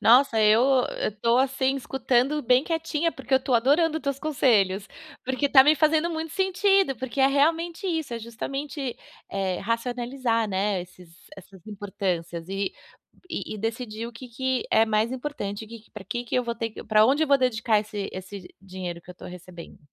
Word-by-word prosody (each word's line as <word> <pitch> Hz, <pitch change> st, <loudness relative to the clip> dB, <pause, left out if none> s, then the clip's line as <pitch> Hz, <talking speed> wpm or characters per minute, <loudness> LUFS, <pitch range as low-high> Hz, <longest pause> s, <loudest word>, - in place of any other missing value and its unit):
Nossa, 240 Hz, -1 st, +5 dB
eu 215 Hz, +1 st, +5 dB, 0.4 s
eu 215 Hz, -, -1 dB
tô, 235 Hz, +2 st, +3 dB
assim, 270 Hz, 0 st, +1 dB
escutando 265 Hz, +2 st, 0 dB
bem 250 Hz, +2 st, +4 dB
quietinha, 325 Hz, 0 st, -1 dB
porque 265 Hz, 0 st, -9 dB
eu 265 Hz, -, +4 dB
tô 265 Hz, -2 st, 0 dB
adorando 300 Hz, +7 st, +3 dB
teus 280 Hz, -2 st, -2 dB
conselhos, 210 Hz, -10 st, +2 dB, 0.4 s
porque 260 Hz, +3 st, 0 dB
tá 265 Hz, -1 st, +8 dB
me 300 Hz, +2 st, +6 dB
fazendo 310 Hz, +3 st, +2 dB
muito 320 Hz, -1 st, -4 dB
sentido, 385 Hz, -3 st, +2 dB
porque 260 Hz, +3 st, -6 dB
é 265 Hz, -, +6 dB
realmente 330 Hz, +6 st, +1 dB
isso, 320 Hz, -7 st, -2 dB
é 230 Hz, -, -4 dB
justamente, 270 Hz, +4 st, -5 dB, 0.4 s
eh, 190 Hz, -2 st, -1 dB
racionalizar, 235 Hz, +1 st, -1 dB
né, 195 Hz, -1 st, 0 dB
esses 180 Hz, -1 st, -16 dB, 0.2 s
essas 190 Hz, -1 st, -15 dB
importâncias 190 Hz, -5 st, -4 dB
e 195 Hz, 0 st, -2 dB, 0.6 s
e -, -, -4 dB
e -, -, -7 dB
decidir 225 Hz, +1 st, -4 dB
o 235 Hz, -, -9 dB
que 250 Hz, +2 st, -10 dB
que 260 Hz, +1 st, -2 dB
é 220 Hz, -, +5 dB
mais 220 Hz, +1 st, +1 dB
importante, 245 Hz, -7 st, -5 dB
o 215 Hz, -, -16 dB
que 230 Hz, -1 st, -10 dB
que 225 Hz, -, -26 dB
pra 210 Hz, -3 st, -10 dB
que 240 Hz, +3 st, -4 dB
que -, -, -5 dB
eu 250 Hz, -, +2 dB
vou 235 Hz, 0 st, -2 dB
ter 225 Hz, -1 st, -3 dB
que -, -, -10 dB
pra 215 Hz, 0 st, +5 dB
onde 285 Hz, +4 st, +3 dB
eu -, -, -8 dB
vou 280 Hz, -1 st, +5 dB
dedicar 230 Hz, -4 st, +2 dB
esse 210 Hz, -2 st, -5 dB
esse 185 Hz, 0 st, -8 dB
dinheiro 185 Hz, -2 st, -7 dB
que 180 Hz, -, -13 dB
eu -, -, -10 dB
tô -, -, -13 dB
recebendo. 180 Hz, -1 st, -11 dB
240 Hz, 195 wpm, -25 LUFS, 210-275 Hz, 0.6 s, tá